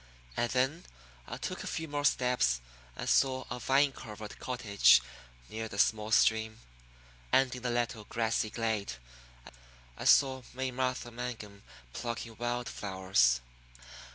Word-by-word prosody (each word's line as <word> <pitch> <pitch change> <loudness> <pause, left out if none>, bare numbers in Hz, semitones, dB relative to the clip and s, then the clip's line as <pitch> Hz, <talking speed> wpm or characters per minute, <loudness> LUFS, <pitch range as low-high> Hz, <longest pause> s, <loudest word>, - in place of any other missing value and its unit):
And 120 - 0
then 135 +7 0 0.4
I - - -6
took - - -5
a - - -6
few 160 - -3
more 145 -1 -2
steps 125 - +2 0.4
and - - -5
saw 130 -1 +2
a 125 - -3
vine 135 +4 +3
covered 105 -4 -9
cottage 110 - +4 0.5
near 110 0 -5
the 100 - -8
small 105 +1 +2
stream. 110 0 +3 0.7
And 130 -1 +3
in 125 - -9
a 125 - 0
little 120 -2 -1
grassy 110 -1 0
glade 110 - -2 1.0
I - - -7
saw 130 -2 +5
May 130 0 -2
Martha 125 -1 -2
Mangum 115 -4 -7 0.3
plucking 115 -1 -5
wild 120 0 -2
flowers. 95 -12 +1
120 Hz, 135 wpm, -31 LUFS, 110-130 Hz, 1.0 s, saw